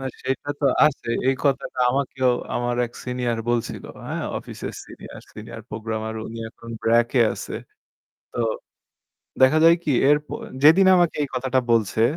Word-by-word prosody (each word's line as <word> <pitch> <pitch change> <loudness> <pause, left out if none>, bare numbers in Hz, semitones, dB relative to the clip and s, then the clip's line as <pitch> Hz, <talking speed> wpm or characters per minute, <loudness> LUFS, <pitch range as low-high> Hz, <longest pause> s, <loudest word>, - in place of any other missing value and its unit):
না, 135 - -6 0.2
সেটা 135 +2 -3
তো - - -1 0.2
আছে। 135 -5 -3 0.2
এই 135 - +3
কথাটা 135 -2 0
আমাকেও 130 -1 0 0.2
আমার 120 0 -1
এক 120 - -17
senior 125 -2 -2
বলছিল, 120 -1 -2 0.2
হ্যাঁ? - - -3 0.2
অফিসের - - -7
senior - - -11
senior 110 +1 -9
programmer। 110 0 -4
উনি 115 0 -8
এখন 115 0 -12
BRAC 115 +1 +3
এ - - +5
আছে। - - -7 0.8
তো - - -7 1.0
দেখা 130 +4 +6
যায় 165 +1 +7
কি? 145 - +1 0.2
এরপর 150 0 0 0.2
যেদিন 175 +6 +7
আমাকে 175 -2 +2
এই 140 - -2
কথাটা 130 0 +1
বলছে 110 0 +2
125 Hz, 155 wpm, -23 LUFS, 115-140 Hz, 1.0 s, যায়